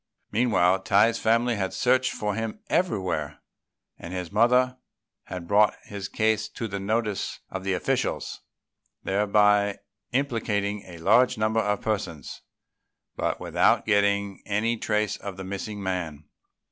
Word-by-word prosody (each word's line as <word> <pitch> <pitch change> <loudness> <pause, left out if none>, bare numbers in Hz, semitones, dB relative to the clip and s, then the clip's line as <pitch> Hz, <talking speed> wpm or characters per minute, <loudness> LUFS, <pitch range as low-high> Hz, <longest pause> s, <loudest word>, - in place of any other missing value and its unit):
Meanwhile, 95 -6 +3
Tai's 105 +4 +3
family 115 +1 +2
had 95 -1 -2
searched 130 0 +2
for 105 -1 -2
him 115 - -4
everywhere, 95 - 0 0.6
and 85 - -8
his 90 -1 -4
mother 125 +4 +3 0.5
had 90 -2 -7
brought 105 +3 +4
his 100 -1 -6
case 110 0 +1
to 115 - -5
the 100 -1 -4
notice 105 0 -2
of 95 -1 -5
the 95 0 0
officials, - - -2 0.6
thereby 105 0 +3 0.3
implicating 105 -6 -1
a 90 -2 -10
large 115 +9 +4
number 110 +1 +1
of 105 -2 0
persons, 95 -10 -3 0.7
but - - -1
without - - +2
getting 100 -2 +1
any 110 +3 +1
trace 105 -2 -1
of 100 -2 -7
the 95 - -6
missing 100 +2 -5
man. 85 -5 -3
105 Hz, 135 wpm, -26 LUFS, 95-115 Hz, 0.7 s, brought